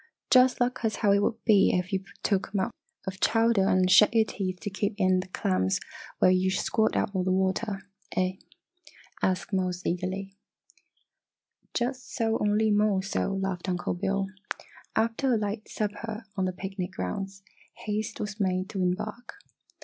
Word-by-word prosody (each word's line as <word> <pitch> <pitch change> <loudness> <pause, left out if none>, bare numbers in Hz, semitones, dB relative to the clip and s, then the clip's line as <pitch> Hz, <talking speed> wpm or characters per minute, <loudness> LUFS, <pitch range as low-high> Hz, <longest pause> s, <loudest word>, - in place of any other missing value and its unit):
"Jus' 255 0 +6
lak' 250 0 0
es 220 -1 +1
how 205 -3 +2
it 200 - +5
woul' 225 +2 +1
be 205 -4 +6
ef 180 +1 -3
yo' 190 - +2 0.2
took 195 -2 +1
a 205 - -1
mouf 190 +5 0 0.3
ful 190 - -3
ov 190 - -15
chowder 225 -3 +3
en' 185 0 +4
shet 210 +4 +6
yer 225 - +6
teeth 185 -2 -3
t' 200 +5 -5
keep 200 +2 -1
in 185 -2 +3
d' 185 - -4
clams 95 - +1 0.4
whiles 185 0 +4
yo' 185 - +2
squirt 220 +3 +1
out - - +1
all 185 -2 0
d' 185 - 0
water, 190 +2 0 0.3
eh?" 185 0 +1 0.8
asked 185 +2 0
Mose, 185 -1 0
eagerly. 185 +2 -2 1.4
"Just 255 +1 -2
so, 225 -2 +1
only 210 +1 +2
more 205 -2 +3
so!" 195 0 -1
laughed 195 -1 -2
Uncle 180 -1 -1
Bill. 195 +2 0 0.7
After 230 +3 +2
a - - +2
light 210 0 -3
supper 215 +1 -4
on 190 -2 0
the 185 - 0
picnic 190 -1 -5
grounds, 195 - -4 0.4
haste 210 0 -2
was 210 +1 -4
made 185 -1 0
to 195 -3 -3
embark. 195 - -2
195 Hz, 170 wpm, -28 LUFS, 185-215 Hz, 1.4 s, Jus